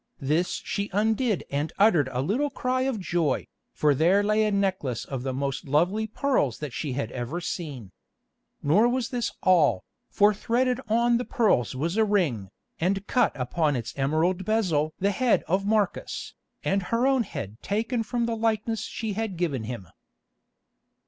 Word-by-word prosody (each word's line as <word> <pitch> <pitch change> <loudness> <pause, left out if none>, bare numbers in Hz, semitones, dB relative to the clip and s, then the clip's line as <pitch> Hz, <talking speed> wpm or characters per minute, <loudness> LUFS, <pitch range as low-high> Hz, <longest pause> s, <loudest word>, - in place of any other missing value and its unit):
This 155 +6 0
she 200 0 -2
undid 220 +1 +1
and 145 +3 -1
uttered 175 -10 +4
a 125 +1 -1
little 250 - 0
cry 255 -2 -1
of 235 -5 -3
joy, 170 -5 0 0.3
for 150 -1 +2
there 175 +8 +3
lay 215 +1 +2
a 210 - +1
necklace 190 - -1
of 135 -3 -5
the 130 +1 -2
most 135 0 -3
lovely 180 +10 +2
pearls 220 - 0
that 150 -5 -6
she 145 -4 -3
had 125 -3 -3
ever 125 +7 -4
seen. 145 - -5 0.7
Nor 200 +12 +4
was 250 -1 -1
this 240 -3 -2
all, 155 - +4 0.3
for 205 +1 +4
threaded 250 +4 0
on 235 +2 +3
the - - -1
pearls 210 - +1
was 165 +9 -2
a 220 - +5
ring, 165 - 0 0.3
and 195 +4 0
cut 250 - +2
upon 145 +4 0
its 115 -3 -4
emerald 160 +7 +1
bezel 175 -8 +1
the 200 +2 +1
head 245 +4 +2
of 195 +4 0
Marcus, 210 -3 -1 0.3
and 195 +1 +1
her 230 +6 0
own 270 -1 +3
head 110 - -6
taken 225 +4 -1
from 235 +2 -1
the 230 -1 -1
likeness 225 0 0
she 220 -3 -4
had 215 -3 -3
given 145 -10 -1
him. 115 -6 -6
190 Hz, 170 wpm, -26 LUFS, 145-220 Hz, 0.7 s, a